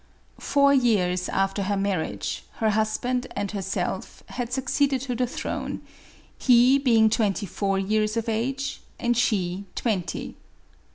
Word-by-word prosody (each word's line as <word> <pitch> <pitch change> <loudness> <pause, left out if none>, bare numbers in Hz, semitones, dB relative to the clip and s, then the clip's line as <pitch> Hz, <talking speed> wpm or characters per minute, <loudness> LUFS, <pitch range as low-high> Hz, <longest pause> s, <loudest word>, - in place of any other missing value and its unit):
Four 280 0 +3
years 190 -9 +2
after 195 +1 0
her 200 +1 0
marriage, 195 -4 -2
her 220 -2 +1
husband 245 +4 0
and 200 -1 -2
herself 195 -2 -3
had 245 -1 -4
succeeded 265 +1 +1
to 260 -2 -3
the 250 +1 0
throne, - - -4 0.6
he 250 +2 +5
being 230 -5 +4
twenty 215 -2 +1
four 195 +1 -1
years 215 +3 0
of 230 - -2
age 260 +5 -2 0.2
and 240 0 +1
she 200 -5 0
twenty. 190 -8 -2
220 Hz, 130 wpm, -25 LUFS, 200-250 Hz, 0.6 s, he